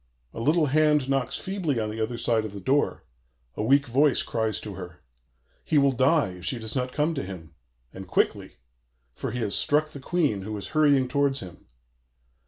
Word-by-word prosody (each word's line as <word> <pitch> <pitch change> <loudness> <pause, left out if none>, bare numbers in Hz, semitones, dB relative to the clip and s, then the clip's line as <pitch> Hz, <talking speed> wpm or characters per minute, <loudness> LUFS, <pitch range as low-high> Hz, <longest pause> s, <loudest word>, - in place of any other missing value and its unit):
A - - -7
little 155 +7 +3
hand 150 -1 +3
knocks 135 -3 0
feebly 180 -10 -2
on 105 -1 -2
the 110 +1 -5
other 115 +2 -2
side 115 -2 +1
of 110 -2 -6
the 100 - -7
door; 135 +9 0 0.5
a - - -3
weak 140 +6 +4
voice 140 +2 +3
cries 110 -2 -1
to 105 - -7
her. 90 -2 -10 0.6
He 155 - +1
will 140 -1 +5
die 135 - +3
if 90 -1 -10
she 105 - +1
does 110 +1 -5
not 125 -1 -1
come 155 +4 0
to 145 - -3
him, 90 -4 -9 0.4
and 95 0 -9
quickly; - - 0 0.6
for - - -5
he 120 +2 -4
has 100 -3 -1
struck 155 +1 +1
the 145 - -9
Queen, 145 - 0
who 105 +2 -5
is 100 - -6
hurrying 145 -4 +3
towards 140 +1 +1
him. 90 -2 -11
130 Hz, 195 wpm, -26 LUFS, 110-145 Hz, 0.6 s, will